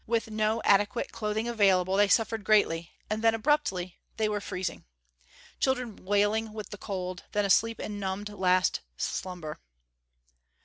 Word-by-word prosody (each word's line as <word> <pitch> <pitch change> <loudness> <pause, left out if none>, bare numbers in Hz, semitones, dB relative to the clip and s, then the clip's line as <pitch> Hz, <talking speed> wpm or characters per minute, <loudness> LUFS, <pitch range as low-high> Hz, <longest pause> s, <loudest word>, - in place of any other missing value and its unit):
With 225 -1 0
no 215 +1 0
adequate 205 +3 +2
clothing 215 +1 -2
available 195 -5 +3
they 205 +1 +5
suffered 225 0 +2
greatly 170 -5 +2 0.2
and 215 +1 -2
then 225 0 +5
abruptly 195 -8 0 0.2
they 220 - +2
were 210 -1 -2
freezing. 185 -3 -4 0.8
Children 250 -5 0
wailing 205 +3 +1
with 215 -1 -7
the 205 - -8
cold; 185 -3 -5
then 205 -1 +2
asleep 225 +4 +3
in 205 -1 -5
numbed, 195 +1 -3
last 185 -2 +2 0.2
slumber.... 175 -4 -4
205 Hz, 140 wpm, -28 LUFS, 190-220 Hz, 0.8 s, they